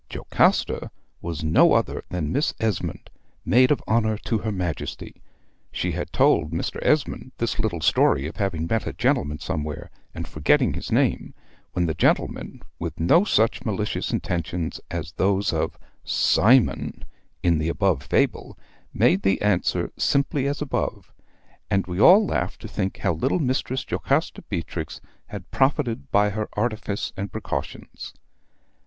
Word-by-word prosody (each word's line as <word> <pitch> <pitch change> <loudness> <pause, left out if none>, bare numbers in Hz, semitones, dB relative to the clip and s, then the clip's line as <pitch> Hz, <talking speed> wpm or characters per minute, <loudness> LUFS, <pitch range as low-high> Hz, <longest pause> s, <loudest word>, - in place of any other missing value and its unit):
Jocasta - - +1 0.3
was 85 -2 -4
no 80 0 +5
other - - 0
than 80 -4 -2
Miss 145 - 0
Esmond, 110 -6 -2 0.3
Maid 130 +1 +5
of 150 - +1
Honor 110 -1 +1
to 115 - 0
her 110 +1 -3
Majesty. 90 -6 -5 0.5
She - - -2
had - - -4
told 75 - +3
Mr. 80 +2 -3
Esmond 140 -3 0
this 115 0 -2
little 105 -8 -1
story 70 -2 +3
of 80 - -6
having 90 -6 -1
met 110 +5 -1
a - - -3
gentleman 75 +1 0
somewhere, 75 -4 -4 0.2
and - - -5
forgetting 75 -1 +2
his - - -6
name, - - +1 0.4
when 90 -1 +1
the 80 - 0
gentleman, - - 0 0.2
with - - -5
no 160 - +5
such 110 - +1
malicious 105 -2 -2
intentions 85 -1 -3
as 80 -3 -4
those 100 +1 +1
of - - -1 0.3
"Cymon" 125 +5 +3 0.4
in 85 -3 +3
the 80 +1 -1
above 90 -4 +1
fable, - - 0 0.4
made 95 - +3
the 95 0 +2
answer 105 -4 +1
simply 140 0 +1
as 145 +1 -2
above; 140 - -3 0.6
and 100 -1 +1
we 90 0 -4
all 195 - +8
laughed - - -2
to - - -7
think 95 -2 -3
how - - 0
little 80 - 0
Mistress 130 -3 -1
Jocasta 140 +4 -1
Beatrix 80 -4 -4 0.3
had - - -9
profited 130 - 0
by 105 0 +3
her 105 +1 -3
artifice 105 -2 -2
and 100 -1 -5
precautions. - - -6
100 Hz, 150 wpm, -24 LUFS, 85-115 Hz, 0.6 s, all